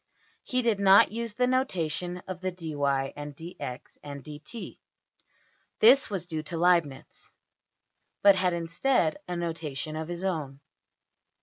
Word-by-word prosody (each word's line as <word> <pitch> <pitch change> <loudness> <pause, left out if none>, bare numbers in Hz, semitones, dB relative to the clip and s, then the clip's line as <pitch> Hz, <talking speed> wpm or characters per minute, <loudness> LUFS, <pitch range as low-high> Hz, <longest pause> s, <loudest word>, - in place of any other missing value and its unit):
He 255 0 -1
did 225 -4 +2
not 195 -1 +6
use 230 -1 -4
the 250 - +2
notation 180 - -1
of 185 -1 -6
the 185 - -1
$dy$ 145 -6 -1
and~$dx$, 145 -2 -8
and~$dt$ 150 - -9 1.0
(this 255 +4 +6
was 195 -5 -3
due 160 -3 -4
to 165 +2 -6
Leibnitz), 170 -5 +1 0.9
but 200 -1 +8
had 185 -1 +1
instead 170 +2 +1
a 180 - -3
notation 160 -3 -4
of 160 0 -4
his 175 +1 -5
own. 150 -8 -3
170 Hz, 125 wpm, -28 LUFS, 155-195 Hz, 1.0 s, but